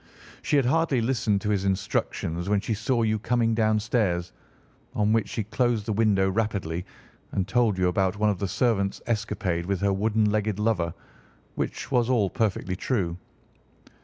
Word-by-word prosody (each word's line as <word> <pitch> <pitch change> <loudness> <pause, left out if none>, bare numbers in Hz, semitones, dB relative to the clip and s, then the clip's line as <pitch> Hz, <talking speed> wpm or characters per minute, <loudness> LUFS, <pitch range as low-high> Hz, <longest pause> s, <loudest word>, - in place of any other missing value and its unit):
She - - 0
had 140 -3 +4
hardly 150 0 +2
listened 115 -4 +1
to 105 -1 -1
his 100 -2 0
instructions 95 -2 -1
when 105 -1 +3
she 110 - -2
saw 115 +3 0
you 110 -1 +1
coming 115 +1 +1
downstairs, 110 -5 +1 0.6
on 105 +1 +2
which 115 -1 +1
she 110 - -2
closed 115 0 0
the 110 - -1
window 100 -3 +3
rapidly 95 -5 -2 0.5
and 95 -1 -1
told 110 -2 +2
you 90 -1 +2
about 95 +2 +1
one 105 0 +3
of 100 - -4
the 100 - -1
servants' 100 -2 0
escapade 105 -6 -1
with 100 -2 0
her 100 -1 +2
wooden 105 +1 +1
legged 105 -1 0
lover, 105 -6 0 0.6
which - - -4
was 120 -1 +2
all 110 -7 +2
perfectly 100 -5 -1
true. 90 -5 -1
105 Hz, 165 wpm, -26 LUFS, 95-115 Hz, 0.6 s, had